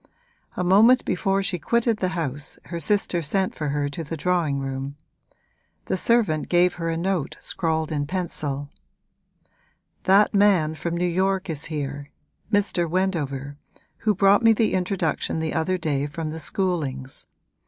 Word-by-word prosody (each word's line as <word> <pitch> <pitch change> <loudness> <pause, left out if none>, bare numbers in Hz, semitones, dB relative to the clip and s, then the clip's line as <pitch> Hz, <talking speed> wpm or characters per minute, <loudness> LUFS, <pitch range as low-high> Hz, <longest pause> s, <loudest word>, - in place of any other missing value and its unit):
A 180 - 0
moment 220 +8 +5
before 195 +2 0
she 185 -2 -1
quitted 235 - +1
the 185 - 0
house 145 -2 -4
her 170 -1 -5
sister 195 -2 +1
sent 190 +5 0
for 150 - -4
her 145 0 0
to 165 +3 -5
the 160 +2 -5
drawing 170 -3 0
room; 135 +1 -4 0.9
the - - -1
servant 195 -7 +1
gave 180 0 +4
her 165 - -1
a 165 - -1
note 175 -3 -2
scrawled 160 -2 -1
in 145 -2 -1
pencil: 145 -5 -3 1.3
'That 200 +3 +5
man 195 -6 +4
from 170 +2 -3
New 180 - 0
York 190 +1 0
is 155 -1 -3
here 145 -2 -4 0.4
Mr. 195 -5 +1
Wendover, 145 -7 -2 0.4
who 215 -2 +1
brought 195 +2 +5
me 225 -1 +6
the 220 0 +1
introduction 180 -4 -1
the 160 -1 -2
other 185 +3 0
day 145 -4 -1
from 155 +1 -5
the 160 - -6
Schoolings. 150 -8 -2
170 Hz, 155 wpm, -24 LUFS, 150-195 Hz, 1.3 s, me